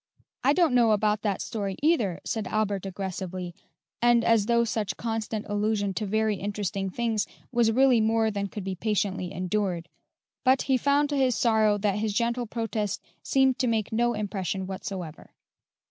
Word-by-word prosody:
"I 275 +3 +4
don't 335 -5 +3
know 235 -3 +5
about 210 0 +1
that 205 -3 -1
story, 200 -3 -3
either," 235 - +2
said 220 -4 -2
Albert 205 -3 -1
aggressively, 185 -2 -5 0.5
and 240 -1 +4
as 225 -3 +3
though 235 0 +3
such 220 -3 -2
constant 225 -2 -3
allusion 205 -1 0
to 210 +1 -3
very 215 0 +1
interesting 200 -1 -3
things 225 +1 -1 0.2
was 235 -2 +3
really 255 -1 +4
more 220 0 +2
than 200 -1 -2
could 205 0 -7
be 190 0 -3
patiently 190 -2 -1
endured; 185 -2 -2 0.5
but 260 0 +4
he 265 - +2
found 285 +3 +2
to 290 - -1
his 260 -3 +2
sorrow 220 -3 +3
that 205 0 0
his 215 -1 -1
gentle 235 +2 0
protest 220 -3 -2 0.2
seemed 265 -1 +2
to 255 - +1
make 220 -3 0
no 240 +1 +1
impression 195 -2 -3
whatsoever. 185 -4 -7
215 Hz, 165 wpm, -27 LUFS, 195-235 Hz, 0.5 s, know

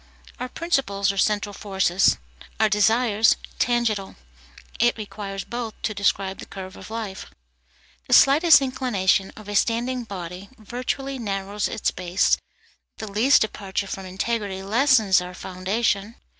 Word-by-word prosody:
Our 250 - -4
principles 245 - 0
are 200 - -8
central 205 0 +1
forces, 195 -2 +2 0.4
our 220 -1 +4
desires 220 +1 +3 0.2
tangential; 230 -5 0 0.6
it 240 0 +3
requires 200 -2 -6
both 235 -2 -6
to 215 - -1
describe 200 -1 0
the - - -9
curve 190 -1 -8
of - - -11
life. 220 -4 -5 0.8
The - - 0
slightest 295 +1 +7
inclination 205 -8 +1
of 215 -1 -11
a 205 - -5
standing 240 +3 0
body 185 -1 -7
virtually 255 +4 -4
narrows 200 -1 -2
its - - -1
base; 180 +1 +1 0.6
the 220 - -5
least 235 +8 +4
departure 200 -2 -2
from 195 -1 -6
integrity 195 0 -3
lessens 220 -3 +4
our 180 0 -8
foundation. 200 +4 -2
210 Hz, 130 wpm, -24 LUFS, 195-235 Hz, 0.8 s, slightest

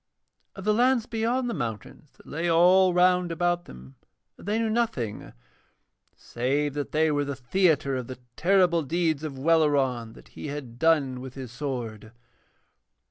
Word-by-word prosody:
Of 195 - -8
the 210 +1 +2
lands 245 +1 +2
beyond 240 +2 -1
the 235 - -2
mountains 120 - -6
that - - -21
lay 165 +3 -3
all 180 +3 +5
round 180 0 +3
about 175 +1 0
them 65 +2 -13 0.4
they 210 +3 -3
knew 225 -1 0
nothing, 140 - -2 0.8
save 140 +4 -2
that 145 0 -4
they 155 0 +2
were 145 -1 +1
the 140 -1 -4
theatre 140 +1 +1
of 125 -2 -4
the 130 - -7 0.2
terrible 180 -2 +3
deeds 160 0 -1
of 145 -4 -5
Welleran, 135 -6 +1
that - - -16
he - - -8
had 135 -5 -7
done 145 -5 +2
with 130 0 -9
his 130 -3 -8
sword. 120 -5 -5
150 Hz, 155 wpm, -26 LUFS, 130-180 Hz, 0.8 s, all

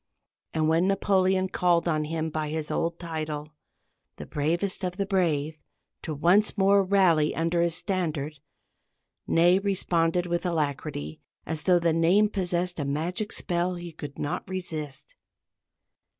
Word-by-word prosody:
And 155 -1 +2
when 165 +3 +3
Napoleon 190 -1 +2
called 175 -2 +2
on 155 -2 +1
him 160 0 -3
by 155 -1 -2
his 155 0 -3
old 165 0 -1
title, 155 -3 -5 0.7
"the 75 - -8
bravest 170 - -1
of 180 0 -3
the 200 - 0
brave," 160 -6 0 0.4
to 155 - -4
once 190 +9 +3
more 200 0 +4
rally 185 -6 +3
under 165 +1 +1
his 170 -1 +1
standard, 155 -6 -2 0.9
Ney 175 +3 +4
responded 175 -3 +1
with 175 0 -1
alacrity, 145 - -3 0.2
as 160 -1 -4
though 180 -2 +4
the 170 -1 +2
name 180 +6 +4
possessed 180 -3 -2
a - - 0
magic 170 +9 -2
spell 175 +1 -1
he 175 -1 -7
could 145 -3 -9
not 145 - -3
resist. 165 - -5
170 Hz, 140 wpm, -27 LUFS, 155-185 Hz, 0.9 s, more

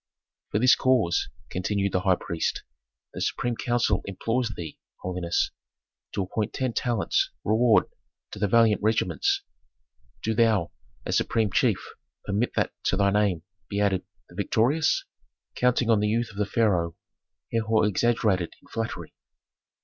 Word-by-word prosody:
"For - - 0
this 125 +4 +6
cause," 125 -10 +2 0.2
continued 100 +2 -1
the 95 - +1
high 95 0 +3
priest, 85 -1 -3 0.5
"the - - -6
supreme 120 -1 -1
council 120 -5 +1
implores 115 +5 -1
thee, 85 -7 -7 0.2
holiness, 90 -2 -1 0.6
to 100 - 0
appoint 105 +3 -3
ten 130 -3 -1
talents' 120 -4 0
reward 110 +1 +4 0.5
to - - -8
the 105 - +2
valiant 115 +1 +4
regiments. 390 - +1 0.8
Do 110 - 0
thou, 110 -6 +2 0.3
as - - +1
supreme 110 -2 +1
chief, - - +1 0.4
permit 105 +4 -1
that - - +1
to 95 - +2
thy 100 0 +3
name 100 -5 +1 0.3
be 100 - -2
added 100 -3 +1 0.3
'The - - -15
Victorious.'" 145 +8 +2 0.5
Counting 125 -1 +2
on 110 - +4
the 105 - +1
youth 115 +2 0
of 100 - -14
the 105 -1 0
pharaoh, 95 -7 +1 0.6
Herhor 110 -1 +2
exaggerated 105 -4 +1
in - - -23
flattery. 115 0 -4
105 Hz, 140 wpm, -26 LUFS, 100-115 Hz, 0.8 s, this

